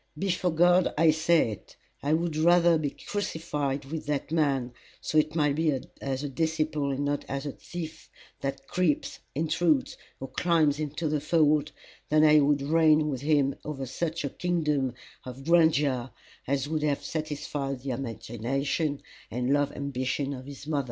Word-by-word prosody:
Before 185 0 0
God 175 +2 +4
I 160 0 +6
say 160 -5 +3
it 105 - -10 0.3
I 145 +2 +1
would 165 0 0
rather 170 +1 +5
be 150 -2 -1
crucified 150 -8 -3
with 150 +2 -6
that 150 0 -2
man, 135 -6 +1 0.3
so 155 - +1
it 155 +1 0
might 150 -3 +2
be 155 -4 +1 0.2
as 135 0 -2
a - - -2
disciple 155 0 -1
and 140 +1 -1
not 145 0 -1
as 140 +1 -3
a 145 - -2
thief 160 0 -8 0.3
that 135 0 -4
creeps, 180 -5 0 0.2
intrudes, 155 -1 +1 0.2
or 135 - -5
climbs 160 -4 +2
into 155 +2 -2
the 150 -1 0
fold, 155 -3 +2 0.4
than 155 +1 +4
I 155 0 +7
would 145 -1 +2
reign 155 0 +4
with 130 -3 -3
him 145 -2 +2
over 140 -3 -4
such 160 +4 -3
a - - -1
kingdom 150 -8 0 0.3
of 130 +1 -9
grandeur 150 -7 +3 0.4
as 140 +1 0
would 155 0 -1
have 145 -2 0
satisfied 145 -3 -3
the 135 0 -3
imagination 135 +4 -2 0.3
and 125 +3 0
love 145 0 +2
ambition 140 0 -2
of 130 0 -8
his 140 0 -9
mother. 150 -1 0
150 Hz, 165 wpm, -28 LUFS, 140-160 Hz, 0.4 s, I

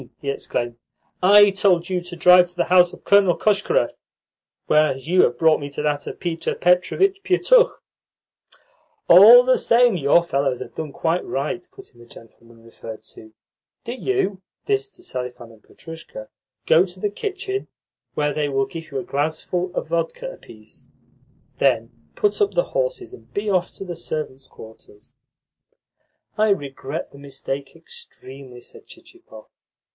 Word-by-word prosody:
he 140 - -3
exclaimed. 120 -3 -4 0.4
"I 205 +2 +6
told 185 -3 +1
you 185 -1 -2
to 175 0 -10
drive 180 +1 +6
to 175 - -15
the 175 - +1
house 180 -1 +5
of - - -14
Colonel 200 -3 +4
Koshkarev, 215 - +1 0.7
whereas 150 -3 +1
you 180 +2 +4
have 120 - +1
brought 160 +1 +3
me 145 - -6
to 145 +1 -6
that 145 -1 -2
of - - -7
Peter 170 -2 -3
Petrovitch 185 - +1
Pietukh." 440 +6 +3 1.3
"All 220 +8 +9
the 255 0 +2
same, 240 -2 +3
your 145 +3 +3
fellows 135 -5 -1
have - - -9
done 155 -2 -6
quite 165 +5 -1
right," 175 +6 -4
put - - -15
in 120 - -22
the 120 - -16
gentleman 115 0 -17
referred 115 -1 -11
to. 110 0 -15 0.5
"Do 240 - -5
you" 255 - -2 0.2
(this 410 -1 -1
to 360 - -18
Selifan 125 - -7
and 110 -1 -20
Petrushka) 160 -9 -11 0.4
"go 165 +3 +5
to 185 -1 -10
the 205 +2 -2
kitchen, 390 - -5 0.5
where 150 -1 0
they 150 -1 -1
will 135 -1 0
give 160 +3 -9
you 140 - -5
a 130 - -3
glassful 160 +6 -3
of - - -4
vodka 170 - -2
apiece. - - -16 0.7
Then - - +1 0.2
put 415 0 0
up 405 - +1
the - - +3
horses, - - -2
and 390 - -15
be 205 0 -1
off 180 -2 0
to 195 - -8
the 175 -2 -6
servants' 155 -5 -6
quarters." 110 -1 -16 1.3
"I 215 0 +3
regret 145 -4 -4
the 140 - -15
mistake 140 0 -6
extremely," 135 - -12
said - - -15
Chichikov. 110 -1 -16
175 Hz, 160 wpm, -21 LUFS, 140-210 Hz, 1.3 s, All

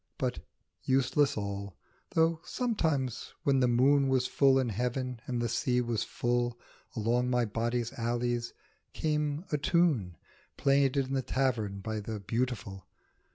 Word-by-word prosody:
But - - -1 0.4
useless 135 +1 +2
all, 100 -2 -4 0.4
though 165 0 +3
sometimes 160 - -1
when 135 -1 +3
the 125 - +4
moon 135 +3 +4
Was 130 -1 +2
full 135 +1 +4
in 130 -3 +1
heaven 125 +3 -2
and 125 -2 -1
the 120 - 0
sea 125 +2 +1
was 120 -3 0
full, 120 0 -1 0.4
Along 120 +2 +1
my 125 -1 +2
body's 115 +2 -2
alleys 120 0 -1 0.4
came 150 +1 -1
a 150 - +1
tune 145 - +2 0.4
Played 140 -1 +3
in 135 -1 0
the 135 - +1
tavern 120 -7 -1
by 110 +1 -3
the 105 +1 -5
Beautiful. 100 -3 -3
125 Hz, 140 wpm, -30 LUFS, 115-135 Hz, 0.4 s, the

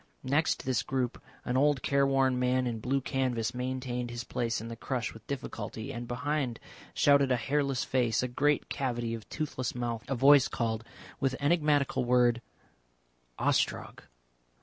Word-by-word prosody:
Next 145 +5 +1
this 130 -3 +1
group 130 -2 -2 0.2
an 125 - -1
old 140 0 +3
careworn 135 -2 +2
man 125 0 +2
in 115 -2 -2
blue 135 +4 0
canvas 125 -4 -1
maintained 125 -1 -3
his 120 0 -5
place 115 -1 -2
in 115 - -7
the 115 - -6
crush 125 +1 -3
with 110 - -15
difficulty, 115 -2 -5
and 120 0 -6
behind 130 0 -2 0.4
shouted 140 -2 +4
a - - +5
hairless 135 +2 0
face, 125 -3 +1
a - - 0
great 145 +4 +1
cavity 120 -3 -2
of 115 -2 -7
toothless 135 -6 -3
mouth. 120 -2 -3
A 135 - -1
voice 135 +1 +6
called 110 -1 -2 0.4
that 135 -1 +1
enigmatical 145 -3 +2
word 120 -1 +3 1.0
"Ostrog." - - 0
125 Hz, 150 wpm, -30 LUFS, 120-140 Hz, 1.0 s, voice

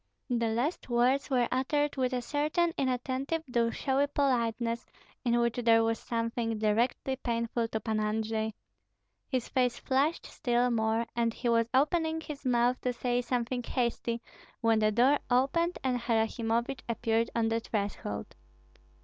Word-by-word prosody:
The 235 -1 +1
last 250 +7 -1
words 250 +4 +2
were 250 -3 +2
uttered 290 +3 +1
with 260 -2 0
a 250 -1 -2
certain 305 +5 +1
inattentive 265 +4 -1
though 235 -2 +1
showy 275 +3 +1
politeness, 235 -4 0 0.4
in 240 -1 +2
which 235 0 +1
there 230 -2 +4
was 225 0 0
something 230 -1 -2
directly 230 +5 +1
painful 235 -2 -1
to 220 - -3
Pan 220 -1 -1
Andrei. 220 0 -1 0.7
His 255 -4 -1
face 250 -2 +1
flushed 280 +5 0
still 245 0 0
more, 225 0 +1
and 230 -1 0
he 245 - -1
was 230 0 +3
opening 320 +4 +2
his 300 -3 -8
mouth 245 0 +2
to 250 - 0
say 245 0 0
something 245 0 -1
hasty, 235 -1 -2 0.4
when 225 -1 +3
the 215 0 +3
door 255 +7 +4
opened 275 +8 +2
and 255 -2 +1
Harasimovich 230 +2 0
appeared 230 0 +1
on 225 -1 +2
the 225 0 +1
threshold. 200 - -4
240 Hz, 150 wpm, -30 LUFS, 230-260 Hz, 0.7 s, there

